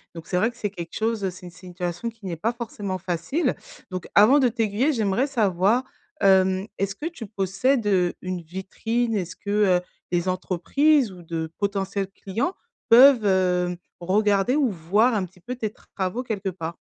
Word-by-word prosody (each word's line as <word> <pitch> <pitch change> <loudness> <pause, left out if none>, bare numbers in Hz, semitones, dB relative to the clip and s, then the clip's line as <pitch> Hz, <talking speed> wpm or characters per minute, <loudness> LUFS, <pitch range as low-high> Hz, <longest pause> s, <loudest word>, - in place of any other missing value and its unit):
Donc, 165 -1 -9
c'est 180 - 0
vrai 220 +6 +3
que - - -25
c'est 205 - -2
quelque 170 -4 -8
chose 220 -3 0
c'est 180 0 -11
une 175 - -9
situation 180 +4 -5
qui 225 -3 -15
n'est 175 -3 -3
pas 230 +8 -1
forcément 205 -5 -5
facile. 180 - -1 0.4
Donc 185 -1 -5
avant 235 +8 +7
de 255 - +4
t'aiguiller, 230 +5 +1
j'aimerais 220 +4 +1
savoir, 215 -1 +2 0.4
hem, 190 0 +4
est-ce 195 0 -1
que 295 - -7
tu 325 -10 -7
possèdes, 205 +5 0
heu, 180 -3 +2
une 185 -1 -4
vitrine? 225 +7 -2
Est-ce 180 -3 -3
que, 200 - -9 0.3
heu, - - -11 0.3
les 175 +1 0
entreprises 220 - +2
ou 180 -1 -12
de 160 -1 -4
potentiels 200 -1 -1
clients 225 - -3 0.4
peuvent, 245 -1 +8
hem, 180 -2 +2 0.2
regarder 200 +6 +2
ou 280 -5 +3
voir 205 +7 +2
un 195 -3 0
petit 180 0 -19
peu 250 +5 -5
tes 220 -3 -2 0.3
travaux 195 +6 -2
quelque 205 -5 -3
part? 165 -2 -6
195 Hz, 175 wpm, -24 LUFS, 180-230 Hz, 0.4 s, peuvent